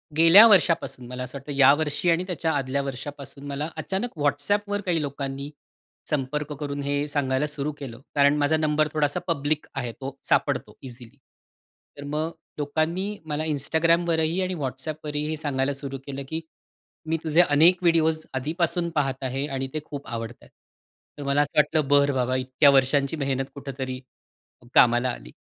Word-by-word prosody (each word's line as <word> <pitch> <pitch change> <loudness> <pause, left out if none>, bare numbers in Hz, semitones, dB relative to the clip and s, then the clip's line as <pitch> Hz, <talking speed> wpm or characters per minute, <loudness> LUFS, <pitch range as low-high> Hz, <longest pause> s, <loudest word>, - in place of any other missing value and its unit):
गेल्या 165 +7 +9
वर्षापासून 175 - +2
मला 125 +1 -5
असं 125 +2 -6
वाटतं, 140 +2 -8
या 140 0 +8
वर्षी 155 +3 -1
आणि 170 +2 +2
त्याच्या 165 -3 -1
आदल्या 140 0 -1
वर्षापासून 140 +1 -7
मला 145 +2 -3
अचानक 195 0 -3
Whatsappवर 205 +8 0
काही 170 -4 +1
लोकांनी 140 0 -4 0.6
संपर्क 150 +1 -2
करून 145 -1 -4
हे 145 +1 -1
सांगायला 145 -1 0
सुरु 150 0 -2
केलं. 125 -4 -8 0.2
कारण 145 +1 +4
माझा 150 +2 +2
नंबर 155 -1 +2
थोडासा 145 -2 0
पब्लिक 150 -2 -1
आहे 125 -3 -3
तो 135 +1 -5
सापडतो - - +1
इझिली. 125 0 -11 0.8
तर 145 - -8
मग 155 +3 -2 0.3
लोकांनी 165 +8 -1
मला 155 0 -2
Instagramवरही 160 +3 +1
आणि 185 0 -1
Whatsappवरही 150 +3 -4
हे 155 - -1
सांगायला 140 -2 -1
सुरू 135 0 -6
केलं, 140 0 -5
की 160 +1 -3 0.7
"मी 160 - 0
तुझे 160 +2 +3
अनेक 165 +5 +5
व्हिडिओज 160 -2 +2
आधीपासून 170 +5 -1
पाहत 135 -2 -1
आहे 135 +2 -2
आणि 135 -2 -3
ते 155 - -1
खूप 145 -2 -8
आवडत 115 0 -5
आहेत." - - -18 0.7
तर - - -6
मला 140 +1 +3
असं 145 - -3
वाटलं, 150 -1 +3
बरं 140 0 +4
बाबा 130 0 0
इतक्या 130 +3 +4
वर्षांची 140 +2 +2
मेहनत 135 -2 -1
कुठेतरी 130 -2 -5 0.7
कामाला 120 +1 +5
आली. - - -9
145 Hz, 160 wpm, -25 LUFS, 135-160 Hz, 0.8 s, गेल्या